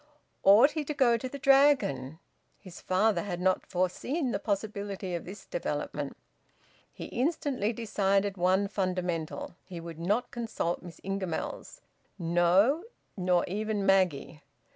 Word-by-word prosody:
Ought 215 Hz, +9 st, +7 dB
he 310 Hz, -1 st, -2 dB
to 300 Hz, -, -4 dB
go 255 Hz, -4 st, +4 dB
to 255 Hz, +3 st, -4 dB
the 280 Hz, -, -6 dB
Dragon? 270 Hz, -, +3 dB, 0.4 s
His 185 Hz, -4 st, -12 dB
father 190 Hz, 0 st, +2 dB
had 180 Hz, -2 st, -4 dB
not 185 Hz, +1 st, +1 dB
foreseen 240 Hz, -, -1 dB
the -, -, -1 dB
possibility 200 Hz, -2 st, -3 dB
of 170 Hz, -, -4 dB
this 195 Hz, +4 st, -9 dB
development. -, -, -4 dB, 0.7 s
He -, -, -8 dB
instantly 260 Hz, -5 st, -1 dB
decided 200 Hz, -3 st, 0 dB
one 185 Hz, +2 st, +2 dB
fundamental: 180 Hz, -6 st, -2 dB
he 180 Hz, -3 st, -8 dB
would 165 Hz, -1 st, -8 dB
not 205 Hz, +8 st, 0 dB
consult 225 Hz, -7 st, -2 dB
Miss 175 Hz, -2 st, -11 dB
Ingamells; 195 Hz, -, -4 dB, 0.4 s
no, 180 Hz, -, +3 dB, 0.3 s
nor 180 Hz, -2 st, +2 dB
even 210 Hz, +1 st, -2 dB
Maggie! 180 Hz, -6 st, +2 dB
195 Hz, 130 wpm, -29 LUFS, 180-235 Hz, 0.7 s, Ought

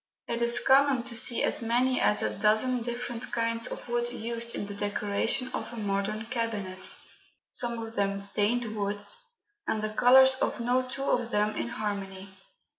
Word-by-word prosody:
It 235 Hz, -, -2 dB
is 235 Hz, 0 st, +5 dB
common 270 Hz, -2 st, +4 dB
to 235 Hz, -, -5 dB
see 235 Hz, +1 st, +3 dB
as -, -, +1 dB
many 245 Hz, +3 st, +1 dB
as 210 Hz, -, +2 dB
a -, -, -1 dB
dozen 220 Hz, +4 st, +2 dB
different 240 Hz, 0 st, -5 dB
kinds 230 Hz, 0 st, 0 dB
of -, -, -7 dB
wood 240 Hz, 0 st, -1 dB
used 235 Hz, 0 st, -4 dB
in -, -, -3 dB
the 205 Hz, -, -7 dB
decoration 205 Hz, +5 st, -1 dB
of -, -, -4 dB
a 240 Hz, -, -9 dB
modern 210 Hz, +1 st, -2 dB
cabinet 220 Hz, -6 st, -1 dB, 0.5 s
some 235 Hz, -1 st, -2 dB
of 225 Hz, 0 st, -6 dB
them 200 Hz, -2 st, 0 dB
stained 215 Hz, +3 st, +1 dB
woods, 205 Hz, -, -3 dB, 0.5 s
and 215 Hz, -1 st, -1 dB
the 215 Hz, 0 st, -3 dB
colours 260 Hz, +3 st, +7 dB
of -, -, 0 dB
no 250 Hz, +2 st, 0 dB
two 270 Hz, +1 st, -5 dB
of 245 Hz, -4 st, 0 dB
them 210 Hz, -2 st, 0 dB
in -, -, -2 dB
harmony. 200 Hz, -4 st, -5 dB
230 Hz, 175 wpm, -28 LUFS, 205-240 Hz, 0.5 s, colours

